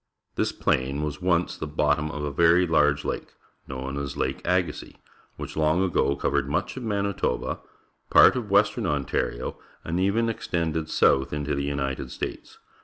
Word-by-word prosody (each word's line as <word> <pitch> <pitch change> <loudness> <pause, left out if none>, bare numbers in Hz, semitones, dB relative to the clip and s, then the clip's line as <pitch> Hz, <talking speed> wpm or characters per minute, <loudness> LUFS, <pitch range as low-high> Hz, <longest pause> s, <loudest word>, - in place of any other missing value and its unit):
This - - 0
plain 70 +3 0
was 75 0 -4
once 90 -1 +1
the 75 - -5
bottom 75 0 +1
of 75 -2 -5
a 75 - -2
very 85 +4 +4
large 75 -3 +2
lake, - - -4 0.3
known 65 +1 -4
as 70 0 -5
Lake 65 0 -2
Agassiz, 90 -2 -1 0.4
which - - -7
long 80 +3 +2
ago 85 -6 +1
covered 70 - 0
much 80 - -1
of 130 - -6
Manitoba, 100 - -1 0.5
part - - +7
of 120 -5 -3
western 100 +2 +3
Ontario, - - -2 0.2
and 85 +2 -2
e\'en 100 +5 +2
extended 80 -7 -2
south 65 0 +3
into 75 -1 -2
the 70 0 -1
United' 70 -2 -2
States. - - -6
75 Hz, 160 wpm, -25 LUFS, 70-90 Hz, 0.5 s, part